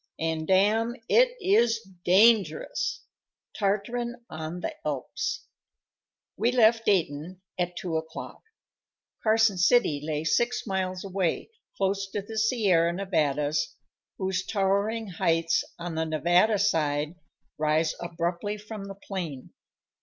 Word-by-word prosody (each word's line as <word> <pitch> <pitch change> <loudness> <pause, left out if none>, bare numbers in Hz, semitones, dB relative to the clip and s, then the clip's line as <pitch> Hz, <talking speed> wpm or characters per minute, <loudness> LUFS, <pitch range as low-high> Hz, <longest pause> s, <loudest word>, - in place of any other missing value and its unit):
And, 160 -1 -2
dame! 215 +5 +3
it - - +4
is 240 - +3 0.2
dangerous! 220 - +3 0.5
Tartarin 225 +4 -1 0.2
on 160 +3 -5
the - - -3
Alps. 145 -4 -3 0.9
We 230 +5 +1
left 230 -2 +4
Dayton 180 -1 0 0.2
at 175 0 -1
two 170 -3 -2
o'clock. 160 0 -7 0.8
Carson 220 -3 +3
City 180 - +3
lay 155 0 -2
six 240 +10 +1
miles 185 -3 -2
away, 190 - -2 0.3
close 195 0 0
to 205 - -2
the 220 +2 -4
Sierra 200 -7 +3
Nevadas, 150 -5 0 0.4
whose 190 -1 -1
towering 200 +3 0
heights, 165 -3 +1
on 175 0 -5
the 160 0 -1
Nevada 175 +7 +3
side, 155 -6 +1 0.5
rise 155 +1 +2
abruptly 175 +4 -3
from 210 -1 -8
the 195 0 -8
plain. 175 -9 -6
190 Hz, 115 wpm, -27 LUFS, 160-215 Hz, 0.9 s, it